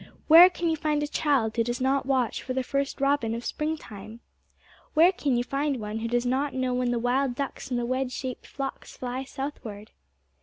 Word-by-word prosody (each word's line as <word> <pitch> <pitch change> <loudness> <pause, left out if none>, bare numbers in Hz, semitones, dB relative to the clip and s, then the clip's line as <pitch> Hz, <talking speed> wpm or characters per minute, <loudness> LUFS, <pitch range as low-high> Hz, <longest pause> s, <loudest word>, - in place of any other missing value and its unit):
Where 335 +3 +10
can 345 -1 -3
you 325 - +2
find 300 -1 0
a - - -1
child 275 -7 +1
who 230 - +2
does 240 +2 -3
not 265 +1 +1
watch 260 -4 +1
for 255 - -4
the 260 0 -1
first 275 +2 -2
robin 275 -5 +1
of 235 - -6
spring 310 +1 -2
time? 215 -2 -11 0.8
Where 335 +4 +7
can 280 -9 0
you 240 - +1
find 275 +1 -1
one 210 +1 -4
who 230 - -2
does 240 +1 0
not 265 +3 0
know 255 -1 0
when 250 0 0
the 240 - 0
wild 245 +2 +1
ducks 275 0 -5
in 250 - -1
the 240 - -1
wedge 255 +1 -1
shaped 255 -1 -5
flocks 275 -1 -6
fly 255 +1 -4
southward? 235 -7 -7
260 Hz, 215 wpm, -27 LUFS, 240-280 Hz, 0.8 s, Where